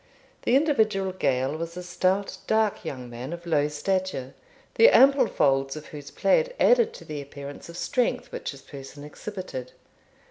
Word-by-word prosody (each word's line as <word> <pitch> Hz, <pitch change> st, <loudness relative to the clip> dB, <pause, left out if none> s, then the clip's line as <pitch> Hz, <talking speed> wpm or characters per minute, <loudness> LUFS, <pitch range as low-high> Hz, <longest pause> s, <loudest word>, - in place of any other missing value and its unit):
The 245 Hz, -, +2 dB
individual 220 Hz, -10 st, +2 dB
Gael 135 Hz, -5 st, 0 dB
was 165 Hz, +1 st, -6 dB
a 180 Hz, -, -5 dB
stout, 185 Hz, +2 st, 0 dB
dark, 220 Hz, -1 st, +1 dB
young 125 Hz, -2 st, -6 dB
man, 120 Hz, +5 st, -7 dB
of 170 Hz, 0 st, -8 dB
low 150 Hz, -3 st, +2 dB
stature, 150 Hz, -3 st, -2 dB, 0.4 s
the 465 Hz, -, +7 dB
ample 275 Hz, -, +6 dB
folds 135 Hz, -5 st, +1 dB
of 155 Hz, -1 st, -8 dB
whose 145 Hz, -2 st, -9 dB
plaid -, -, +2 dB
added 475 Hz, -2 st, +5 dB
to 485 Hz, -, -11 dB
the 150 Hz, -2 st, -5 dB
appearance 140 Hz, +2 st, -9 dB
of 170 Hz, -, -9 dB
strength 250 Hz, +5 st, -1 dB
which -, -, -5 dB
his 140 Hz, -2 st, -9 dB
person 140 Hz, +1 st, -10 dB
exhibited. 150 Hz, -5 st, -7 dB
170 Hz, 165 wpm, -26 LUFS, 140-215 Hz, 0.4 s, the